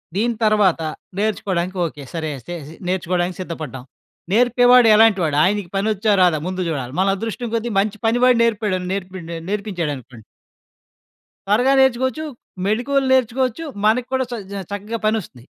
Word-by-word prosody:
దీని 230 +4 +1
తర్వాత, 210 -6 +3 0.4
నేర్చుకోడానికి 190 -4 -1
ఓకే. 150 -3 -7
సరే 160 -2 -3
అయితే 175 +8 -9 0.3
నేర్చుకోవడానికి 180 -1 -1
సిద్ధపడ్డాం. 155 -8 -6 0.5
నేర్పేవాడు 245 +1 +5
ఎలాంటి 220 -2 +5
వాడు? 150 -2 0
ఆయనకి 200 -1 0
పనొచ్చా? 210 +1 +1
రాదా? 175 -4 +4
ముందు 185 0 -3
జూడాలి. 135 -5 -3
మన 190 - +3
అదృష్టం 225 +2 -4
కొద్దీ 230 +1 -2
మంచి 210 +1 -1
పని 230 +2 +2
వాడు 250 -2 +5
నేర్పాడు 210 -4 0
నేర్పిన్ండు 185 -3 -5
నేర్పించాడనుకోండి 150 - -4 1.2
త్వరగా 240 +7 +3
నేర్చుకోవచ్చు, 260 +4 +2 0.4
మెడికోల్ 255 +6 +1
నేర్చుకోవచ్చు. 255 +2 +1 0.2
మన 215 +1 +5 0.2
కూడా 260 0 +1
చ - - -3 0.2
జా 200 - -4
చక్కగా 210 +3 -4
పనొస్తుంది. 205 - -2
205 Hz, 135 wpm, -20 LUFS, 175-230 Hz, 1.2 s, నేర్పేవాడు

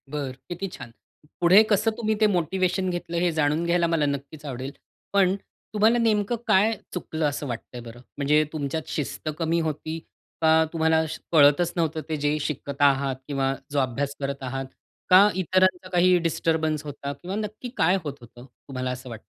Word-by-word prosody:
बरं, 140 -2 -4 0.2
किती 180 +3 -4
छान! 120 -9 -10 0.5
पुढे 180 +4 +7
कसं 215 +2 +3
तुम्ही 220 -2 0
ते 215 - +6
मोटिव्हेशन 185 0 0
घेतलं 175 -1 -3
हे 175 0 +2
जाणून 155 +1 +1
घ्यायला 170 0 +2
मला 165 -3 +1
नक्कीच 140 +2 -4
आवडेल. 130 0 -5 0.4
पण 195 -1 +4 0.4
तुम्हाला 220 +3 +4
नेमकं 220 -1 +1
काय 210 +4 +4 0.2
चुकलं 160 -3 -3
असं 145 0 -5
वाटतंय 120 0 -6
बरं? 120 0 -11 0.2
म्हणजे 150 +2 +3
तुमच्यात 155 +1 -3
शिस्त 155 +1 -4
कमी 165 0 +1
होती 155 +1 -4 0.4
का 160 0 +5
तुम्हाला 160 0 +2
श 155 - -6
कळतच 155 +2 +5
नव्हतं 160 -2 0
ते 160 - 0
जे 145 +1 0
शिकत 140 -1 -4
आहात 140 -1 +3
किंवा 135 -2 0 0.2
जो 145 - +1
अभ्यास 135 +2 -1
करत 140 -1 -4
आहात? 135 +1 -3 0.4
का 190 +3 +8
इतरांचा 185 0 +1
काही 180 0 +4
डिस्टर्बन्स 160 -2 0
होता 140 -1 -5
किंवा 175 +7 -6
नक्की 215 +3 -5
काय 180 +4 +4
होत 145 -3 -4
होतं, 120 +1 -14 0.2
तुम्हाला 130 -1 -3
असं 125 0 -7
वाटतं? 115 -2 -8
160 Hz, 170 wpm, -25 LUFS, 140-180 Hz, 0.5 s, का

